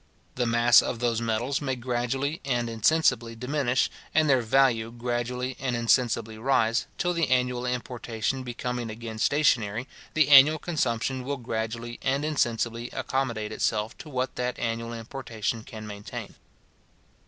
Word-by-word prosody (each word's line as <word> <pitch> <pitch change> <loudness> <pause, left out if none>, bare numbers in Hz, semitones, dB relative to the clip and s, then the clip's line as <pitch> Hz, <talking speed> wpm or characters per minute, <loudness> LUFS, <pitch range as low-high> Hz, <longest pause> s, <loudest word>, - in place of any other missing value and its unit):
The 125 -1 -1
mass 120 +1 +6
of 120 - -3
those 120 -1 0
metals 115 +5 -1
may 135 -2 -1
gradually 125 +4 -2
and 120 -3 0
insensibly 115 -1 +2
diminish, 125 +1 +1 0.3
and 155 -1 +4
their 130 -3 +4
value 115 -1 +3
gradually 120 +2 -3
and 125 -2 -1
insensibly 115 -2 +1
rise, 115 -2 +2
till 175 0 0
the 170 -2 0
annual 125 -1 +1
importation 125 0 -3
becoming 125 -1 -4
again 110 0 -7
stationary, 120 -5 +2 0.3
the 155 -2 +4
annual 145 +2 +8
consumption 130 -5 -1
will 140 +2 -3
gradually 115 0 -4
and 135 +2 0
insensibly 120 -5 -1
accommodate 115 -5 -2
itself 110 +1 -1
to 155 - -9
what 130 -2 -2
that 125 0 -2
annual 115 0 -2
importation 115 -1 -4
can 110 -1 -9
maintain. 105 -1 -7
120 Hz, 140 wpm, -27 LUFS, 115-135 Hz, 0.3 s, annual